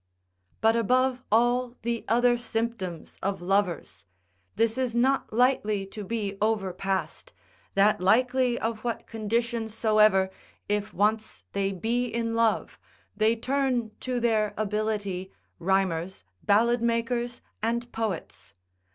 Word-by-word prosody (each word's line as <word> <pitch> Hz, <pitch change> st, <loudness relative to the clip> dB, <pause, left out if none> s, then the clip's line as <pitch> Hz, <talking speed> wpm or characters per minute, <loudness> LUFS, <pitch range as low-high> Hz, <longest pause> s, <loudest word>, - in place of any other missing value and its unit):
But 225 Hz, +1 st, +4 dB
above 255 Hz, +3 st, +2 dB
all 240 Hz, +2 st, +2 dB
the 235 Hz, 0 st, -2 dB
other 240 Hz, +2 st, +4 dB
symptoms 225 Hz, -7 st, -4 dB
of 195 Hz, 0 st, -1 dB
lovers, 185 Hz, -, -1 dB, 0.5 s
this 225 Hz, 0 st, +2 dB
is 255 Hz, -2 st, -1 dB
not 265 Hz, +3 st, +2 dB
lightly 215 Hz, -4 st, +2 dB
to 205 Hz, +2 st, -8 dB
be 200 Hz, -1 st, -3 dB
overpassed, 195 Hz, -3 st, -1 dB, 0.4 s
that 200 Hz, 0 st, +4 dB
likely 250 Hz, +5 st, +3 dB
of 225 Hz, -1 st, -2 dB
what 235 Hz, 0 st, -3 dB
condition 230 Hz, +1 st, -2 dB
soever, 215 Hz, -3 st, +3 dB, 0.4 s
if 205 Hz, 0 st, -1 dB
once 215 Hz, +3 st, 0 dB
they 195 Hz, 0 st, 0 dB
be 230 Hz, +6 st, -1 dB
in 230 Hz, -1 st, -2 dB
love, 230 Hz, -1 st, +1 dB, 0.4 s
they 215 Hz, +2 st, +3 dB
turn 255 Hz, -2 st, 0 dB
to 250 Hz, -1 st, -2 dB
their 215 Hz, -3 st, +1 dB
ability, 210 Hz, -3 st, -2 dB, 0.3 s
rhymers, 190 Hz, -1 st, 0 dB, 0.2 s
ballad 235 Hz, +4 st, +3 dB
makers, 235 Hz, +1 st, -1 dB, 0.2 s
and 235 Hz, +2 st, -1 dB
poets. 220 Hz, -7 st, -5 dB
225 Hz, 115 wpm, -27 LUFS, 200-235 Hz, 0.5 s, But